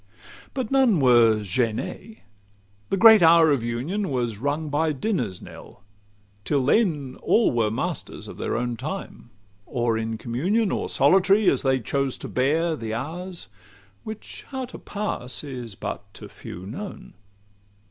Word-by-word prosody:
CIII - - -21
But 260 -4 -3
none 260 - +4
were 120 -4 +5
"gêné:" 115 - -3 0.7
the 195 - 0
great 220 0 +8
hour 165 -1 +6
of 140 -4 +2
union 145 - -2
Was 120 -6 -2
rung 145 +4 -2
by 155 +2 +1
dinner's 130 - -2
knell; 100 - -13 0.6
till 140 +1 0
then 150 - +1
all 230 - +3
were 115 -3 +1
Masters 110 - -4
of - - -9
their - - -2
own 120 0 -2
time 155 -2 -6 0.4
or 120 -3 0
in 110 0 -3
communion, 180 - 0
Or - - -2
solitary, 195 +2 +4
as - - 0
they 135 -1 +2
chose 135 +3 -1
to - - -7
bear 160 +6 +1
The 110 -5 -4
hours, 170 +8 -6 0.6
which 220 -1 -8
how 265 -2 -4
to 245 - -11
pass 200 -13 -4
is 125 -7 -7
but 100 0 -6
to - - -10
few 90 +2 -10
known. 190 - -8
145 Hz, 150 wpm, -24 LUFS, 120-195 Hz, 0.7 s, great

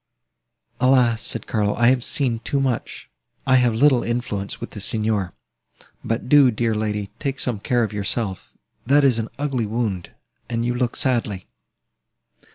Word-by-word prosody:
"Alas!" 125 -3 +3
said - - -3
Carlo, 105 -2 0
"I 120 0 +4
have 125 -2 +2
seen 125 -5 -1
too 140 +4 -2
much! 130 -4 -2 0.4
I 130 -1 +5
have 120 -3 +2
little 130 0 +4
influence 115 -4 -3
with - - -7
the 105 - -7
Signor. 105 -2 -1 0.7
But 115 +2 -2
do, 140 -1 +6
dear 115 0 0
young 110 0 -1
lady, 105 -2 -3
take 140 -2 -2
some 120 -5 -2
care 120 +3 +1
of 105 -1 -3
yourself; 100 -1 -3 0.3
that 140 +4 +4
is 130 -4 +4
an 115 - -3
ugly 135 -6 -1
wound, 105 -5 -2 0.4
and 115 -1 -1
you 120 - 0
look 125 -1 -1
sadly." 115 -8 -1
120 Hz, 165 wpm, -22 LUFS, 105-130 Hz, 0.7 s, do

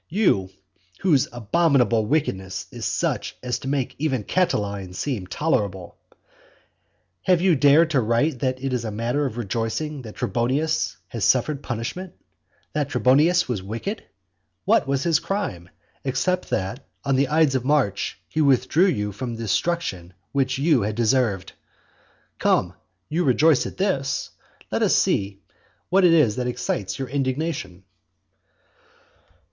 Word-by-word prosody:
you 155 - +2 0.5
whose 155 -9 +3
abominable 120 -3 +2
wickedness 95 -11 -1
is - - -8
such - - -1
as 125 -1 -2
to - - -8
make 135 -2 -1
even 135 -7 0
Catiline 100 - -1
seem 110 -6 -3
tolerable. 95 - -1 1.3
Have 180 -2 +3
you 180 -1 +4
dared 145 +4 +5
to 135 -4 +3
write 120 +5 +1
that 130 0 -2
it 135 -1 -1
is 125 -2 -1
a 110 - -3
matter 120 +7 -1
of 120 -2 -7
rejoicing 120 +7 -3
that 110 -4 -10
Trebonius 135 +7 0
has 115 -5 -4
suffered 135 +6 +2
punishment? 135 +10 -5 0.6
that 145 -2 -1
Trebonius 155 +8 +3
was 120 -6 -2
wicked? 115 - -5 0.6
What - - +3
was 135 0 0
his 165 -3 +3
crime, 100 - -3 0.3
except 180 +7 -1
that 100 +9 -2 0.2
on 135 -1 +2
the 135 +1 +2
ides 155 -2 +3
of 130 -2 0
March 130 -8 0
he 155 - -1
withdrew 140 +6 +3
you 105 - -1
from 115 +4 -5
the 115 - -6
destruction 100 - -1 0.2
which 135 -2 0
you 145 -2 +3
had 105 +1 -2
deserved? 110 -4 +1 0.9
Come; - - +2 0.3
you 170 +4 0
rejoice 150 +1 +4
at - - -10
this; 140 -9 -1 0.4
let - - 0
us - - +3
see 100 0 0 0.5
what 190 +1 +4
it 175 - +6
is 145 -11 +4
that 125 -1 -1
excites 120 -5 -2
your 135 - -4
indignation. 130 - -3
130 Hz, 140 wpm, -23 LUFS, 110-155 Hz, 1.3 s, it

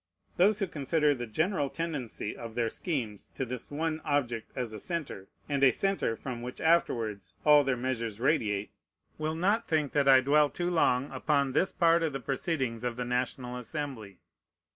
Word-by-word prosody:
Those 200 +4 +4
who 200 - 0
consider 150 -2 +1
the 120 -3 -5
general 155 - 0
tendency 145 -11 -4
of 115 -1 -8
their 115 -2 0
schemes 120 - -4
to 135 - -2
this 125 -1 -6
one 155 +2 -2
object 125 -6 -1
as 125 -4 -3
a 110 - -6
centre, 145 - -4 0.2
and 140 -2 0
a 135 - +8
centre 195 -12 0
from 120 0 -6
which 125 +1 -6
afterwards 110 - +1
all 150 -1 +7
their 135 -2 0
measures 115 -4 -3
radiate, 110 -7 +1 0.5
will 155 +1 -1
not 205 +7 +1
think 155 -4 +1
that 140 -2 +2
I 135 -1 +8
dwell 145 +2 +4
too 175 +3 -2
long 135 -5 +2
upon 140 -3 +1
this 165 +7 +2
part 170 -1 +4
of 160 -3 0
the 135 - -3
proceedings 130 -2 -2
of 120 -1 -2
the 125 0 -3
National 125 0 -2
Assembly. 125 - -6
135 Hz, 180 wpm, -30 LUFS, 120-155 Hz, 0.5 s, a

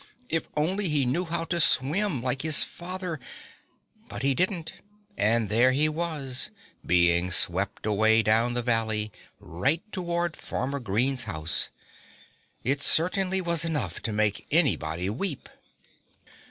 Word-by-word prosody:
If 165 -1 -2
only 185 +5 +2
he 145 -3 +3
knew 160 +9 -1
how 165 0 -3
to 170 +1 -2
swim, 155 - +3
like 130 +1 -1
his 155 -2 +4
father! 180 -2 -6 0.9
But - - -6
he 140 0 +2
didn't; 170 +1 -1 0.4
and 115 +1 +1
there 120 +5 +3
he 150 +3 +3
was, 155 -5 -2 0.3
being 85 0 +2
swept 95 +4 +2
away 110 +1 +3
down 115 +3 +1
the 120 - -1
valley, 110 -2 0 0.3
right 135 - -1
toward 175 -2 -3
Farmer 140 +2 -4
Green's 120 +3 -1
house. 80 -5 -1 0.9
It 140 +2 +1
certainly 185 +4 +3
was 170 -2 0
enough 160 -3 -3
to 115 - -2
make 105 -1 -1
anybody 90 - +1
weep. 140 - -3
135 Hz, 130 wpm, -26 LUFS, 110-165 Hz, 0.9 s, his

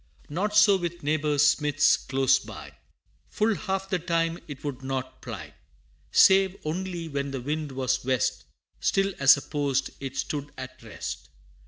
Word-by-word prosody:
Not 200 +8 -2
so 210 -2 +7
with 175 -2 -5
neighbor 150 0 0
Smith's 145 0 +4
close 135 -1 +2
by; - - -10 0.6
Full 220 +1 +1
half 195 -2 -3
the 185 -2 -1
time 165 0 0
it 145 -3 -9
would 140 -3 -4
not 130 -1 -4
ply: 95 - -8 0.6
Save 190 -1 +5
only 175 +1 -3
when 140 -2 -3
the 135 -1 -4
wind 150 +2 -3
was 130 -1 -1
west, 130 -3 0 0.3
Still 195 0 +1
as 140 +1 +7
a 145 - -6
post 140 -3 -1
it 135 -1 -6
stood 145 -1 -3
at 130 0 -8
rest. - - -7
150 Hz, 155 wpm, -26 LUFS, 135-175 Hz, 0.6 s, so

